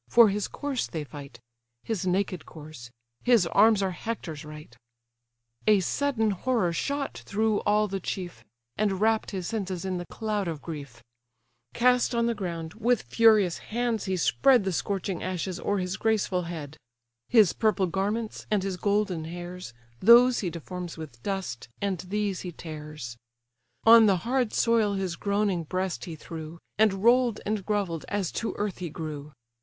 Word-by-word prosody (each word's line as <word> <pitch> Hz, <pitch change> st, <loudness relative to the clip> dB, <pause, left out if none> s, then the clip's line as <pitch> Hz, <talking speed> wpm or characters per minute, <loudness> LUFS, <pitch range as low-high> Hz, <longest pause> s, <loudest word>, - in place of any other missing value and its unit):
For 230 Hz, -, +7 dB
his 205 Hz, 0 st, -1 dB
corse 285 Hz, -4 st, -3 dB
they 160 Hz, -4 st, -4 dB
fight; 140 Hz, -4 st, -10 dB, 0.4 s
His 195 Hz, -5 st, -2 dB
naked 185 Hz, -1 st, 0 dB
corse: 150 Hz, -6 st, -11 dB, 0.3 s
his 235 Hz, -7 st, +5 dB
arms 205 Hz, +4 st, +4 dB
are 190 Hz, -, 0 dB
Hector's 175 Hz, -6 st, -5 dB
right." 150 Hz, -5 st, -11 dB, 0.9 s
A 210 Hz, -2 st, +6 dB
sudden 225 Hz, +3 st, 0 dB
horror 195 Hz, -3 st, 0 dB
shot 280 Hz, +9 st, -2 dB
through 215 Hz, +1 st, +1 dB
all 210 Hz, +1 st, +3 dB
the 195 Hz, -1 st, -3 dB
chief, 175 Hz, -, -5 dB, 0.3 s
And 200 Hz, -3 st, +1 dB
wrapp'd 220 Hz, +1 st, +2 dB
his 190 Hz, -3 st, -4 dB
senses 190 Hz, -3 st, -3 dB
in 185 Hz, -1 st, -2 dB
the 175 Hz, -, -7 dB
cloud 210 Hz, -3 st, -2 dB
of 160 Hz, -3 st, -3 dB
grief; 140 Hz, -8 st, -8 dB, 0.7 s
Cast 250 Hz, 0 st, +3 dB
on 235 Hz, 0 st, +2 dB
the 235 Hz, -, +1 dB
ground, 170 Hz, -6 st, -5 dB
with 235 Hz, +1 st, +1 dB
furious 205 Hz, -, +4 dB
hands 235 Hz, -1 st, -2 dB
he 190 Hz, -1 st, -1 dB
spread 255 Hz, +6 st, +4 dB
The 190 Hz, -, -1 dB
scorching 195 Hz, +1 st, -2 dB
ashes 185 Hz, 0 st, -3 dB
o'er 205 Hz, -, 0 dB
his 180 Hz, 0 st, -2 dB
graceful 200 Hz, -5 st, 0 dB
head; 155 Hz, -3 st, -7 dB, 0.5 s
His 215 Hz, -7 st, +5 dB
purple 215 Hz, -3 st, +2 dB
garments, 205 Hz, +5 st, -2 dB
and 210 Hz, -3 st, +1 dB
his 190 Hz, -2 st, -3 dB
golden 200 Hz, -5 st, 0 dB
hairs, 175 Hz, -1 st, -7 dB, 0.3 s
Those 240 Hz, +3 st, +7 dB
he 185 Hz, -, -1 dB
deforms 175 Hz, +1 st, -7 dB
with 140 Hz, -7 st, -9 dB
dust, 185 Hz, -, -4 dB
and 195 Hz, -3 st, -1 dB
these 200 Hz, +1 st, -2 dB
he 180 Hz, -, -5 dB
tears; 150 Hz, -7 st, -8 dB, 0.7 s
On 225 Hz, -1 st, +8 dB
the 195 Hz, -2 st, +4 dB
hard 250 Hz, -2 st, +1 dB
soil 225 Hz, -3 st, +2 dB
his 190 Hz, -3 st, -2 dB
groaning 200 Hz, -2 st, 0 dB
breast 185 Hz, +3 st, -3 dB
he 170 Hz, -, -6 dB
threw, 160 Hz, +1 st, -8 dB, 0.2 s
And 200 Hz, -3 st, +3 dB
roll'd 240 Hz, -1 st, +4 dB
and 210 Hz, -1 st, -1 dB
grovell'd, 195 Hz, -6 st, -2 dB
as 200 Hz, -4 st, -1 dB
to 230 Hz, -, -3 dB
earth 205 Hz, -3 st, -2 dB
he 175 Hz, -2 st, -4 dB
grew. 150 Hz, -2 st, -6 dB
195 Hz, 160 wpm, -27 LUFS, 170-220 Hz, 0.9 s, On